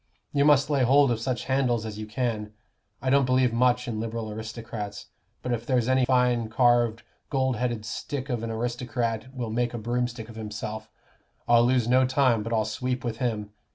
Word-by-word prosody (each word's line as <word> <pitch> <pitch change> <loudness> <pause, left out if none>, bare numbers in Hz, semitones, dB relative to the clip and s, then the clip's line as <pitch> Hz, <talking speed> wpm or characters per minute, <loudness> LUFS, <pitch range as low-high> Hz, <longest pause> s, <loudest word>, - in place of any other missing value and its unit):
You 140 -1 +3
must 145 0 +4
lay 140 -2 +2
hold 135 +1 +5
of 115 - 0
such 120 0 -2
handles 125 -4 +1
as 105 -1 -6
you 110 - -5
can. 110 -2 -2 0.5
I 130 - +1
don't 140 -1 +4
believe 130 -2 +3
much 125 +1 +2
in 110 -3 -3
Liberal 115 -1 -4
aristocrats; 110 -2 -6 0.3
but 125 - -2
if 115 -1 -2
there's 125 -2 +1
any 130 0 +3
fine 125 -3 +2
carved 120 -1 +3 0.3
gold 130 -4 0
headed 120 -2 -2
stick 140 +2 -4
of 120 -5 -2
an 115 - -4
aristocrat 120 +1 -2
will 125 -4 -4
make 120 +1 -1
a - - -2
broomstick 120 0 -2
of 115 -1 -11
himself, 110 0 -6 0.6
I'll 120 0 +5
lose 125 -2 +2
no 130 +2 +5
time 130 -4 +3
but 115 +2 -5
I'll 110 -2 +2
sweep 125 +3 -3
with 115 -2 -3
him. 110 -5 -2
120 Hz, 190 wpm, -26 LUFS, 110-130 Hz, 0.6 s, hold